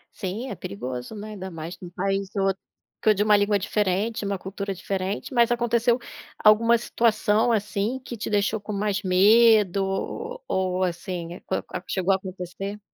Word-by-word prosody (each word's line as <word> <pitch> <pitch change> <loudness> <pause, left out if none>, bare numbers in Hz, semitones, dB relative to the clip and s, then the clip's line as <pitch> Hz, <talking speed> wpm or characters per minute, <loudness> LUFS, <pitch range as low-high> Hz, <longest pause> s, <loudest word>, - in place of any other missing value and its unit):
Sim, 210 +8 -4
é - - -3
perigoso, 125 - -6
né. 210 +1 -7
Ainda 190 -2 -6
mais 165 +1 -7
em 180 - -6
um - - -10
país 195 +1 -1
outro 195 0 +1 0.4
com 215 - +6
de 205 - 0
uma 210 -1 +6
língua 205 0 +2
diferente, 205 +2 0
uma 200 -1 -1
cultura 195 +1 -5
diferente. 190 +5 -3
Mas 235 -1 +4
aconteceu 235 0 +2 0.5
alguma 230 +2 +6
situação 225 -1 +2
assim, 210 +2 0
que 250 -2 -8
te 215 - -4
deixou 205 +1 +1
com 210 +1 -6
mais 205 0 -1
medo? 200 +1 +5
O 455 - -3
ou 185 0 0
assim 175 0 -4
com - - -1
a - - -3
com - - -8
a 180 - -5
chegou 190 +1 +1
a - - +4
acontecer? 190 +2 -6
200 Hz, 180 wpm, -25 LUFS, 185-220 Hz, 0.5 s, com